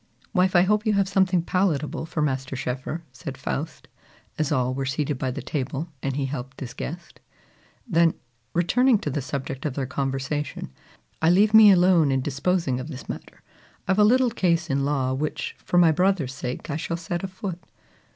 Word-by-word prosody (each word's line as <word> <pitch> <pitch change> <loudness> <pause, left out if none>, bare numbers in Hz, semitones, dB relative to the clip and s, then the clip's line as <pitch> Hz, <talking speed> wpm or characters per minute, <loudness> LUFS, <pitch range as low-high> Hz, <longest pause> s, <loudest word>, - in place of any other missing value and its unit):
"Wife, 185 -1 +2
I 175 - +7
hope 210 +3 +1
you 215 - +3
have 200 -1 +2
something 190 -2 +2
palatable 170 -4 0
for 155 -1 -1
Master 135 -2 -2
Schoeffer," 130 +6 -4
said 130 +1 -8
Faust, 150 +3 -4 0.5
as 155 -1 0
all 130 -3 +1
were 135 +1 -2
seated 135 +1 -2
by 130 - -1
the 125 - -5
table, 145 +3 -3
and 135 0 -2
he 140 -1 -1
helped 130 -1 -6
his 125 -3 -6
guest. 170 +3 -7 0.7
Then, 170 -5 +3 0.4
returning 245 +8 +4
to 150 - -4
the 145 - -2
subject 135 0 -5
of 145 -4 -2
their 140 - -1
conversation, 135 - -3 0.5
"Aye, 160 - +4
leave 205 +5 +4
me 220 -1 +9
alone 175 -5 +5
in 135 0 +1
disposing 140 0 0
of 130 - -6
this 140 -4 -8
matter. - - -8 0.4
I've 190 +2 +2
a - - +7
little 250 +3 +4
case 170 -7 +1
in 135 0 +1
law, 135 -3 0
which, 150 +3 -3
for 175 - -1
my 170 -2 +6
brother's 180 -5 +1
sake, 130 +1 -5
I 145 - -1
shall 165 +1 -3
set 175 +1 -4
afoot. 185 -2 -5
155 Hz, 185 wpm, -25 LUFS, 135-180 Hz, 0.7 s, me